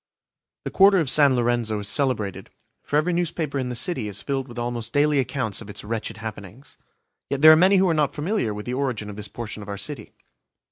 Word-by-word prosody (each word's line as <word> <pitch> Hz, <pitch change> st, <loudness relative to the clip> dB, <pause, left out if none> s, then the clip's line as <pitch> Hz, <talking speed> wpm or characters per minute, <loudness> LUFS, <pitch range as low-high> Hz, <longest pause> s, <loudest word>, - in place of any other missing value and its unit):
The -, -, -4 dB
Quarter 195 Hz, 0 st, +5 dB
of 155 Hz, -7 st, +1 dB
San 140 Hz, -2 st, +5 dB
Lorenzo 120 Hz, -2 st, 0 dB
is 100 Hz, -1 st, -4 dB
celebrated, 115 Hz, -8 st, -1 dB, 0.3 s
for -, -, -4 dB
every 160 Hz, +4 st, +2 dB
newspaper 160 Hz, -4 st, -2 dB
in 125 Hz, -1 st, -3 dB
the 125 Hz, -, -4 dB
city 130 Hz, -, 0 dB
is 100 Hz, -, -5 dB
filled 135 Hz, -2 st, -2 dB
with 120 Hz, -1 st, -12 dB
almost 120 Hz, -1 st, -4 dB
daily 145 Hz, 0 st, +3 dB
accounts 130 Hz, -6 st, -3 dB
of 105 Hz, -, -11 dB
its 105 Hz, -, -8 dB
wretched 110 Hz, +1 st, -4 dB
happenings. 110 Hz, +3 st, -9 dB, 0.5 s
Yet 140 Hz, -1 st, -2 dB
there 155 Hz, -, +11 dB
are -, -, +8 dB
many 185 Hz, +5 st, +4 dB
who 190 Hz, 0 st, +3 dB
are 170 Hz, -, +2 dB
not 150 Hz, -3 st, 0 dB
familiar 155 Hz, -, -1 dB
with 105 Hz, 0 st, -6 dB
the 125 Hz, -, -4 dB
origin 125 Hz, -6 st, -3 dB
of -, -, -10 dB
this 105 Hz, 0 st, -6 dB
portion 110 Hz, -2 st, -7 dB
of 100 Hz, -, -10 dB
our 100 Hz, -, -4 dB
city. 110 Hz, +3 st, -6 dB
125 Hz, 225 wpm, -23 LUFS, 110-150 Hz, 0.5 s, there